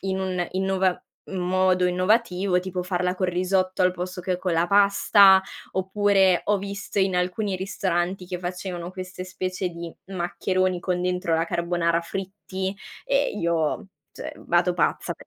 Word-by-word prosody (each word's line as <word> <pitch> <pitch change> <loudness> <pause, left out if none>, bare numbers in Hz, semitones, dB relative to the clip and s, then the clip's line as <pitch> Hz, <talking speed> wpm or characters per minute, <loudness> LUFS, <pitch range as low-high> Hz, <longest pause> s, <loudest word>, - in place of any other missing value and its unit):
in 190 0 -2
un 185 -2 -1
innova 190 -1 +1 0.3
un 190 - -4
modo 185 0 +3
innovativo, 185 0 +2
tipo 185 0 -4
farla 180 0 0
col 185 - 0
risotto 185 +1 +1
al 180 - +5
posto 180 0 -5
che 180 0 -1
con 180 -1 -1
la 165 +1 +2
pasta, 200 -1 +6 0.3
oppure 190 -1 +3
ho 210 - +2
visto 200 0 -5
in 190 -1 +2
alcuni 185 +2 -1
ristoranti 185 -1 -2
che 180 0 -4
facevano 180 -1 -5
queste 185 0 -7
specie 185 0 -3
di 170 -1 -7
maccheroni 185 0 -1
con 180 0 -1
dentro 180 -2 0
la 165 0 +2
carbonara, 170 0 0
fritti 190 +1 -5 0.3
e - - +1
io 170 +1 -1 0.2
cioè, - - -7
vado 175 +1 +2
pazza 175 -3 0
pe - - -17
185 Hz, 155 wpm, -24 LUFS, 180-190 Hz, 0.3 s, pasta